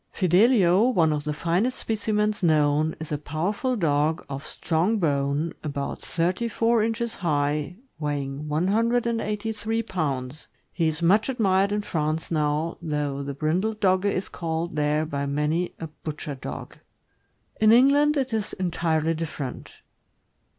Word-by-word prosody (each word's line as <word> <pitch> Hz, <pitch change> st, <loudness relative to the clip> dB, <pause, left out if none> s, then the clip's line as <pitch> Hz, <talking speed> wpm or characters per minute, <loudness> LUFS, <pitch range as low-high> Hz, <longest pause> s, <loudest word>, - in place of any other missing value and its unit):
Fidelio, 195 Hz, +2 st, +4 dB
one 165 Hz, -10 st, +3 dB
of 145 Hz, -1 st, -3 dB
the 150 Hz, -, -1 dB
finest 175 Hz, +11 st, 0 dB
specimens 210 Hz, -1 st, -1 dB
known, 155 Hz, -2 st, +2 dB
is 160 Hz, -1 st, -7 dB
a 150 Hz, -, -1 dB
powerful 185 Hz, -, -1 dB
dog, 155 Hz, -4 st, +1 dB
of 140 Hz, +1 st, -5 dB
strong 170 Hz, +8 st, 0 dB
bone, 145 Hz, -2 st, 0 dB
about 140 Hz, -2 st, -4 dB
thirty 180 Hz, +7 st, -1 dB
four 230 Hz, 0 st, +2 dB
inches 225 Hz, +1 st, -1 dB
high, 150 Hz, -1 st, 0 dB, 0.2 s
weighing 145 Hz, -1 st, -3 dB
183 225 Hz, +4 st, 0 dB
pounds. 145 Hz, -, -3 dB, 0.3 s
He 165 Hz, -3 st, +1 dB
is 160 Hz, +2 st, -2 dB
much 205 Hz, +8 st, +4 dB
admired 200 Hz, -5 st, +2 dB
in 210 Hz, 0 st, 0 dB
France 155 Hz, -3 st, -2 dB
now, 155 Hz, +1 st, 0 dB
though 150 Hz, -3 st, -2 dB
the 140 Hz, 0 st, -5 dB
brindled 180 Hz, +9 st, 0 dB
Dogge 185 Hz, -1 st, +2 dB
is 200 Hz, -1 st, 0 dB
called 165 Hz, -1 st, -3 dB
there, 150 Hz, +1 st, +1 dB
by 140 Hz, -2 st, -3 dB
many, 150 Hz, +5 st, -1 dB
a 165 Hz, -, -4 dB
butcher 155 Hz, -1 st, -6 dB
dog. 130 Hz, -, -8 dB, 0.8 s
In 215 Hz, 0 st, +6 dB
England 285 Hz, +5 st, +5 dB
it 265 Hz, -3 st, -1 dB
is 215 Hz, -2 st, -2 dB
entirely 165 Hz, -3 st, 0 dB
different. 155 Hz, -5 st, -5 dB
165 Hz, 135 wpm, -25 LUFS, 150-210 Hz, 0.8 s, In